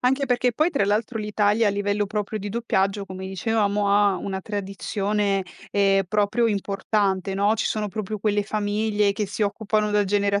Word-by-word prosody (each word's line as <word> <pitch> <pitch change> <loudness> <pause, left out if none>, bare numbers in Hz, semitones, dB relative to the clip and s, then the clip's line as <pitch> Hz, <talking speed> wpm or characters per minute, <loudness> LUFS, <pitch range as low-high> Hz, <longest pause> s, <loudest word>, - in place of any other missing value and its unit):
Anche 265 +3 +2
perché 250 0 +1
poi, 310 +9 +2
tra 280 - +1
l'altro, 215 +3 0
l'Italia 210 +1 +1
a - - +2
livello 205 +1 0
proprio 210 +1 -3
di 205 0 -5
doppiaggio, 200 -2 0
come 190 -1 -7
dicevamo, 205 +1 0
ha 200 -1 +4
una 190 +1 -4
tradizione, 200 0 -1 0.3
ehm, 195 -1 +3
proprio 210 +3 +2
importante, 195 -2 0
no: 205 +2 +2
ci 225 - -1
sono 210 -1 -1
proprio 215 +1 -4
quelle 205 0 +1
famiglie 210 0 0
che 205 +1 -2
si 215 - -3
occupano 210 +1 0
da 210 0 +2
genera 200 0 +1
205 Hz, 175 wpm, -24 LUFS, 200-215 Hz, 0.3 s, ha